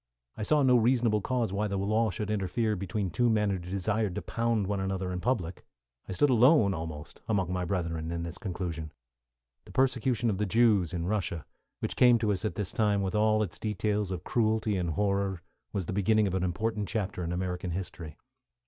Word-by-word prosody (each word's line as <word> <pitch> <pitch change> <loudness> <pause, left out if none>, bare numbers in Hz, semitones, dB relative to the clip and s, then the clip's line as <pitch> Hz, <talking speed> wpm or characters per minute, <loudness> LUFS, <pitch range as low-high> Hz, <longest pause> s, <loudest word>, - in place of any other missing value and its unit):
I - - -7
saw 145 +7 +3
no 125 -2 +5
reasonable 115 -2 +3
cause 120 -3 -1
why 105 +2 0
the 100 -1 -2
law 110 +3 +1
should 105 -2 -3
interfere 105 +2 0
between 95 0 -3
two 120 +7 +2
men 105 -2 +2
who 95 - -1
desired 100 +2 -1
to - - -4
pound 115 -3 0
one 100 +1 -1
another 95 -1 -2
in 90 - -3
public; 95 -6 -2 0.5
I - - -2
stood 135 +10 +3
alone 120 -3 +5
almost 80 -2 -7
among 95 -5 0
my 90 -1 -1
brethren 85 -3 -2
in 85 0 -3
this 85 +1 -6
conclusion. 85 -5 -4 0.7
The - - -13
persecution 125 -3 +1
of 95 - -3
the 105 - 0
Jews 105 -6 +3
in 85 -2 -3
Russia, 90 -5 -2 0.4
which - - -2
came 125 -1 +6
to 110 -2 0
us 95 -1 -2
at 110 - -2
this 105 -4 -3
time 105 -2 +2
with 95 - -2
all 110 0 +3
its 95 - -6
details 105 -1 -1
of 90 -2 -4
cruelty 110 -2 +1
and 90 -2 -1
horror, 100 +1 0 0.3
was 95 -3 -2
the 95 - -4
beginning 110 +2 +3
of 95 - -1
an 95 - 0
important 105 +3 -1
chapter 100 -4 -2
in 85 - -3
American 90 0 -2
history. 85 -3 -6
100 Hz, 200 wpm, -29 LUFS, 90-110 Hz, 0.7 s, came